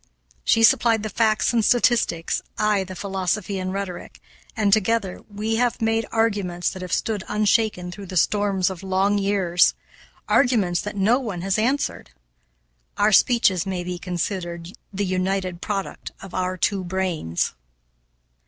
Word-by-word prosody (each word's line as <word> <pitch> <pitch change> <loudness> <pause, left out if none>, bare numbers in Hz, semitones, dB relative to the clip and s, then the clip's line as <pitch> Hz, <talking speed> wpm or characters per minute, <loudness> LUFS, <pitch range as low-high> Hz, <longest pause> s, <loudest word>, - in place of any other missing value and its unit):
She 225 - +3
supplied 225 -1 +4
the 215 - -4
facts 220 +2 +2
and 230 -2 +2
statistics, 230 -8 +2 0.2
I 210 -2 +2
the 185 0 -9
philosophy 195 +1 -2
and 185 0 -3
rhetoric, 195 -2 -6 0.4
and, 205 -2 +3
together, 215 -2 +1
we 215 +2 -2
have 245 0 +1
made 225 0 0
arguments 200 -6 0
that 185 - -8
have 180 -1 -6
stood 210 -4 -1
unshaken 210 -3 +1
through 195 +2 -9
the 185 - -4
storms 195 0 +2
of 185 - -8
long 195 +2 +1
years; 195 -3 +2 0.5
arguments 210 -10 +2
that 210 - -6
no 215 +6 +3
one 210 -9 -5
has 195 +2 0
answered. 260 - -1 0.9
Our 210 +1 +3
speeches 200 -4 +3
may 185 -2 -2
be 180 0 -5
considered 175 -1 -4 0.2
the 200 +1 -2
united 185 -1 -1
product 200 -2 -4
of 195 -2 -11
our 185 0 -2
two 195 +1 0
brains. 175 - -2
195 Hz, 145 wpm, -23 LUFS, 185-215 Hz, 0.9 s, supplied